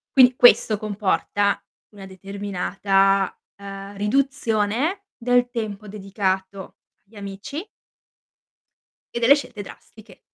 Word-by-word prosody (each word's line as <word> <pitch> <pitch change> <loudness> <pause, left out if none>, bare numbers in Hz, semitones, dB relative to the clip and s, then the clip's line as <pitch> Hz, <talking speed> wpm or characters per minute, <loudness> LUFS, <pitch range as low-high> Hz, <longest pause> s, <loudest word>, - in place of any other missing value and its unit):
Quindi 255 -1 +7
questo 230 -4 +5
comporta 205 -1 0 0.3
una 200 -2 -11
determinata, 195 0 0 0.2
uhm, 200 0 -9
riduzione 260 - 0
del 245 0 +2
tempo 215 -3 -5
dedicato 195 -1 -3 0.3
agli 210 +2 -21
amici 200 - -7 1.5
e - - -1
delle 255 +4 +7
scelte 250 -7 -5
drastiche. 215 0 -15
205 Hz, 95 wpm, -23 LUFS, 195-240 Hz, 1.5 s, Quindi